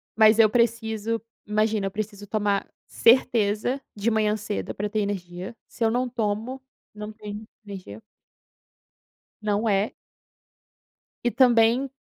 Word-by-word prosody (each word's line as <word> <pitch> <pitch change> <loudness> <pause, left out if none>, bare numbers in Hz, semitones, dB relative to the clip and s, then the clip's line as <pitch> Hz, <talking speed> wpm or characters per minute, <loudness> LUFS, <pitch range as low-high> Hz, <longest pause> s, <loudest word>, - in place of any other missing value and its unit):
Mas 220 0 +6
eu 215 -2 +7
preciso, 230 -1 0 0.2
imagina, 215 -1 +1
eu - - -5
preciso 205 0 -5
tomar 205 -1 0 0.2
certeza 230 +1 +3
de 210 +2 0
manhã 215 -1 +2
cedo 210 0 -4
para 205 +1 -2
ter 215 - -1
energia, 190 0 -4
se 235 - -5
eu 225 - +3
não 250 +2 0
tomo, 230 +3 -2 0.3
não 210 0 -6
tenho 210 -1 -8 0.2
energia. 185 - -9 1.4
Não 210 +1 0
é. 200 +1 +2 1.3
E 240 - +3
também, 240 +1 +4
215 Hz, 125 wpm, -25 LUFS, 205-230 Hz, 1.4 s, eu